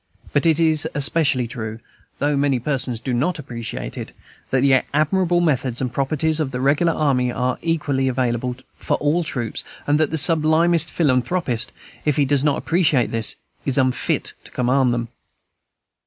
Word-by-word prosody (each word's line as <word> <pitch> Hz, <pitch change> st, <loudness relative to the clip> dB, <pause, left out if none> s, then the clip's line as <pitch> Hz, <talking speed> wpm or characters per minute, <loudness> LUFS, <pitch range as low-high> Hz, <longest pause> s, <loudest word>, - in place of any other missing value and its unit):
But 145 Hz, +3 st, +2 dB
it 160 Hz, -1 st, +3 dB
is 160 Hz, -2 st, +3 dB
equally 140 Hz, -4 st, +2 dB
true, 110 Hz, -2 st, -6 dB, 0.4 s
though 145 Hz, +1 st, 0 dB
many 140 Hz, -1 st, +2 dB
persons 125 Hz, -2 st, -2 dB
do 130 Hz, +1 st, -3 dB
not 145 Hz, +10 st, 0 dB
appreciate 120 Hz, -6 st, -6 dB
it, -, -, -7 dB, 0.4 s
that 130 Hz, -, +1 dB
the 135 Hz, -1 st, +4 dB
admirable 175 Hz, +3 st, +2 dB
methods 130 Hz, -7 st, 0 dB
and 125 Hz, -2 st, -3 dB
proprieties 155 Hz, +3 st, 0 dB
of 150 Hz, -4 st, 0 dB
the 125 Hz, -1 st, -4 dB
regular 145 Hz, +6 st, +2 dB
army 130 Hz, -5 st, +1 dB
are 125 Hz, +1 st, -1 dB
equally 145 Hz, -5 st, 0 dB
available 125 Hz, -1 st, -1 dB, 0.2 s
for -, -, -1 dB
all 155 Hz, +4 st, +1 dB
troops, 125 Hz, -7 st, -3 dB, 0.2 s
and 145 Hz, +1 st, +2 dB
that 155 Hz, -, +2 dB
the 160 Hz, -, -2 dB
sublimest 160 Hz, +1 st, +3 dB
philanthropist, 130 Hz, -3 st, 0 dB, 0.3 s
if 150 Hz, -2 st, +1 dB
he 145 Hz, -, +3 dB
does 140 Hz, 0 st, +2 dB
not 145 Hz, -2 st, +2 dB
appreciate 160 Hz, -7 st, +1 dB
this, 115 Hz, -2 st, -1 dB, 0.3 s
is 135 Hz, -1 st, -1 dB
unfit 130 Hz, -2 st, 0 dB
to -, -, -14 dB
command 125 Hz, 0 st, +1 dB
them. 120 Hz, -1 st, -2 dB
140 Hz, 165 wpm, -21 LUFS, 125-155 Hz, 0.4 s, the